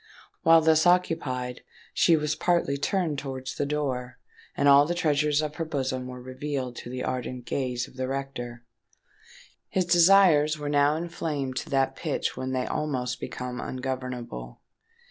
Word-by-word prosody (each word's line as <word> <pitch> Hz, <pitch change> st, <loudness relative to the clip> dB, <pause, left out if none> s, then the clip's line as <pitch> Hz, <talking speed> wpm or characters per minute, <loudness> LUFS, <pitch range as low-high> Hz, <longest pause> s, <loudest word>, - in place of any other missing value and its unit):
While 165 Hz, 0 st, +6 dB
thus 160 Hz, +1 st, +4 dB
occupied, 135 Hz, -8 st, +1 dB, 0.3 s
she 165 Hz, -2 st, +4 dB
was 150 Hz, 0 st, 0 dB
partly 170 Hz, -4 st, +1 dB
turned 155 Hz, 0 st, -1 dB
towards 130 Hz, -1 st, -5 dB
the 145 Hz, -, -2 dB
door; 130 Hz, -4 st, -2 dB, 0.4 s
and 145 Hz, -, +3 dB
all 140 Hz, +1 st, +7 dB
the 175 Hz, -, -1 dB
treasures 150 Hz, -2 st, +2 dB
of 150 Hz, -1 st, -4 dB
her 165 Hz, -, -1 dB
bosom 130 Hz, -4 st, -2 dB
were 125 Hz, 0 st, -8 dB
revealed 130 Hz, 0 st, -4 dB
to -, -, -7 dB
the 125 Hz, 0 st, -4 dB
ardent 125 Hz, -1 st, -4 dB
gaze 125 Hz, -2 st, -2 dB
of -, -, -18 dB
the 130 Hz, 0 st, -2 dB
rector. 130 Hz, -3 st, -5 dB, 1.1 s
His 185 Hz, -1 st, +1 dB
desires 175 Hz, -4 st, +5 dB
were 145 Hz, -1 st, -4 dB
now 145 Hz, +1 st, +3 dB
inflamed 155 Hz, -5 st, -3 dB
to -, -, -4 dB
that 135 Hz, -1 st, +1 dB
pitch -, -, -2 dB
when 130 Hz, 0 st, -4 dB
they 130 Hz, -1 st, -1 dB
almost 130 Hz, -5 st, -2 dB
become 125 Hz, 0 st, -5 dB
ungovernable. 125 Hz, -, -5 dB
140 Hz, 155 wpm, -27 LUFS, 125-155 Hz, 1.1 s, all